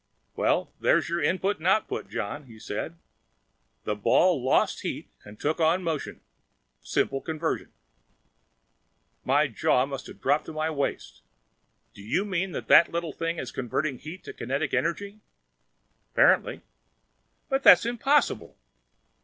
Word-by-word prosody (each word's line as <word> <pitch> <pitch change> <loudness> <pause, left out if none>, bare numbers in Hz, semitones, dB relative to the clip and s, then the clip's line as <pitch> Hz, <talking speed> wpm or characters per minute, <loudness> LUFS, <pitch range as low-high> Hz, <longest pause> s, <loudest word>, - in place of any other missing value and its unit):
"Well, - - 0
there's - - +2
your 170 0 -1
input 185 +6 0
and 165 - -3
output, 205 +3 0
John," 125 +8 -4
he 115 -2 -14
said. 110 +10 -5 0.9
"The 105 - -1
ball 140 - +3
lost 130 - +2
heat - - -5
and 105 0 -13
took 155 +3 -1
on 165 +3 +2
motion. 160 -4 -4 0.6
Simple 135 0 -1
conversion." 160 0 -3 1.5
My 145 +4 +3
jaw 125 0 +1
must 135 -1 -7
have - - -12
dropped 145 +3 +1
to - - -7
my 155 +1 -1
waist. 140 -2 -3 0.7
"Do - - -13
you 120 - -1
mean 190 -1 -2
that - - -5
that 170 - +7
little 170 -3 -3
thing 165 +1 -3
is - - -5
converting 130 +2 -2
heat 170 +5 -9
to - - -8
kinetic 140 +4 -3
energy?" 170 +9 -2 0.9
"Apparently." - - +3 0.9
"But 270 -2 0
that's - - +8
impossible!" 270 +5 +1
160 Hz, 135 wpm, -26 LUFS, 135-180 Hz, 1.5 s, that's